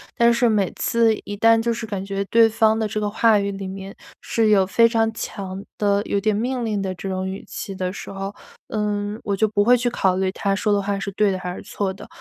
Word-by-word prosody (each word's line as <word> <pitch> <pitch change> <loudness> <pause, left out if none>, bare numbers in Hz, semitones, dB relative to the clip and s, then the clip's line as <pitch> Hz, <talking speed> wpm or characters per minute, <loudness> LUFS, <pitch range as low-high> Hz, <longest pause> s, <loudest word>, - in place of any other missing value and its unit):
但 235 0 +4
是 240 +1 +3
每 210 -4 +1
次 230 -1 +3
一 205 - -5
旦 225 +2 +4
就 235 0 0
是 230 0 -5
感 200 -3 -4
觉 195 0 -2
对 230 0 +6
方 220 0 +2
的 220 - 0
这 215 - -5
个 210 -1 0
话 220 0 +4
语 200 0 -1
里 195 -1 -6
面 195 +1 -7 0.3
是 225 -1 +1
有 200 -3 +4
非 230 +5 +4
常 225 -1 +1
强 195 -3 -6 0.2
的 200 -1 +2
有 - - -1
点 210 +1 +1
命 245 +4 -1
令 210 -3 -1
的 190 -1 -3
这 195 +2 -6
种 185 0 -2
语 190 +1 -6
气 195 - -6
的 185 -1 -2
时 195 - -8
候， 195 +1 -5 0.4
嗯， 210 0 -2
我 200 -2 0
就 215 +2 +2
不 205 -1 +1
会 245 - +6
去 245 0 0
考 190 -5 +1
虑 190 0 0
他 195 0 -1
说 210 +1 0
的 200 0 +2
话 200 0 -2
是 200 0 -4
对 210 +1 +2
的 190 - -1
还 180 -1 -4
是 - - -8
错 195 -2 -3
的， - - -12
205 Hz, 275 characters per minute, -22 LUFS, 195-225 Hz, 0.4 s, 对